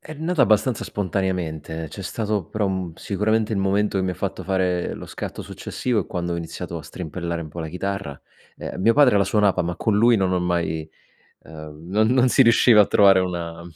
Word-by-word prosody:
È 155 - -10
nata 160 +1 0
abbastanza 110 +2 +2
spontaneamente, 85 -5 -3
c'è 100 - -8
stato 105 0 -2
però 105 -2 -2
un 95 -3 -3
sicuramente 110 +2 -1
il 100 - 0
momento 100 +1 +1
che 95 - 0
mi 95 - -1
ha - - -7
fatto 95 -1 -4
fare 90 -1 -1
lo - - -9
scatto - - -6
successivo 120 -4 -3
è - - -6
quando 85 -2 -3
ho - - -2
iniziato 85 -1 -6
a - - -10
strimpellare 85 0 -5
un 80 - -8
po' 75 - -11
la 80 -1 -4
chitarra. 95 -3 -4 0.4
Ehm, - - -6
mio 115 +4 +4
padre 140 -7 +5
la 100 - +3
suonava, 100 -2 +2
ma 85 0 -3
con 110 +3 0
lui 115 +1 +5
non 95 -2 +1
ho 90 - +2
mai 85 -3 -2 0.6
ehm, 80 0 -11
non 110 +3 +2
non 130 0 +4
si 135 - +5
riusciva 115 -2 +6
a - - +4
trovare 95 -1 +5
una 85 -2 -4
95 Hz, 210 wpm, -22 LUFS, 85-105 Hz, 0.6 s, riusciva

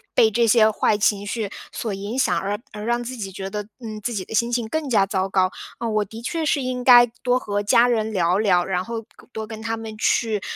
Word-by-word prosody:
被 220 -1 +5
这 235 +2 +2
些 220 -1 +5
坏 215 0 +1
情 205 -1 +1
绪 210 -2 -3 0.2
所 220 -4 -4
影 200 +6 -5
响， 265 - +2
而 205 +1 -3
而 210 0 -7
让 240 +2 0
自 255 +2 -6
己 200 -5 -6
觉 190 +1 -6
得， 210 0 -3 0.2
嗯， 215 -3 -7
自 240 - -2
己 190 -4 -3
的 - - -9
心 235 +2 +1
情 235 -2 -1
更 310 +3 -3
加 205 -5 +4
糟 190 -1 -1
糕， 185 -1 +2 0.3
呃， 235 - -3
我 215 -1 +1
的 220 +3 -10
确 325 +4 -2
是 300 -1 +1
应 255 -1 -3
该 245 -1 +8 0.2
多 250 0 +2
和 205 -4 -2
家 235 +3 +4
人 220 -2 0
聊 180 -1 +1
聊， 180 -5 +3
然 180 -1 -1
后 230 +2 -5
跟 - - -19
多 220 0 -5
跟 220 0 -8
他 225 0 -2
们 220 -1 -7
去， 220 -3 +1
220 Hz, 265 characters per minute, -22 LUFS, 205-235 Hz, 0.3 s, 该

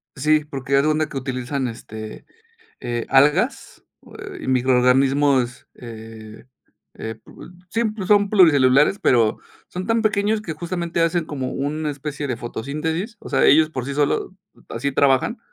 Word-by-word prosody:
Sí, 150 +2 +2
porque 140 -2 -3
haz 140 - +5
de - - +1
cuenta 155 0 +1
que 140 - -6
utilizan, 130 0 -3
este, 110 -2 -9 0.6
eh, 120 -1 -3
algas 150 - +2 0.2
,o - - -17
eh, 395 -2 -9
y - - -6
microorganismos, 130 +1 +2
eh, 110 -2 -11 0.5
eh, 110 -1 -6
pue - - -14 0.2
sí, 230 +5 -1
pues, 215 -3 -3
son 205 -1 +4
pluricelulares, 150 -3 +5
pero, 115 -4 +2 0.3
son 185 +1 -6
tan 225 0 +1
pequeños 210 0 +1
que 180 -6 -5
justamente, 170 +1 -3
hacen 165 0 +1
como 135 -4 -4
una 150 +2 -2
especie 145 0 -5
de 125 - -2
fotosíntesis, 155 - -4
o - - -10
sea, 135 - +2
ellos 155 +2 +5
por 130 -5 -4
sí 140 - -4
solo, 145 +5 0 0.3
así 140 +5 -3
trabajan, 140 - +2
145 Hz, 160 wpm, -21 LUFS, 130-170 Hz, 0.6 s, haz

